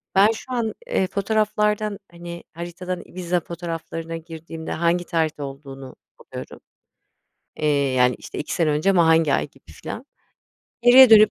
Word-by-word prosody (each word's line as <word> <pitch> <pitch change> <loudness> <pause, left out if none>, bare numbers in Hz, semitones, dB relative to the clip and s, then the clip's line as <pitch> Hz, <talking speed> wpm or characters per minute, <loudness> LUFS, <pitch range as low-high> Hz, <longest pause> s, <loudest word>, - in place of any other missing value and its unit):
Ben 200 +3 +6
şu 225 +3 -8
an, 230 -3 -1
eee, 190 - +1
fotoğraflardan, 210 0 0
hani, 170 0 -8
haritadan 175 +2 -5
Ibiza 180 -1 -2
fotoğraflarına 165 -1 -5
girdiğimde 160 0 -8
hangi 170 +1 +1
tarihte 160 -3 -1
olduğunu 135 -1 -9 0.2
buluyorum, - - -9 1.0
eee, 155 - 0 0.3
yani, 125 -1 +3
işte, - - -9
2 - - -4
sene 165 -3 +2
önce 150 +6 +2
ama 175 -4 +5
hangi 160 -2 +4
ay - - +1
gibi 135 - -19
filan. 245 - -7 0.8
Geriye 250 +1 +9
dönüp 215 -1 +8
170 Hz, 145 wpm, -23 LUFS, 160-200 Hz, 1.0 s, Geriye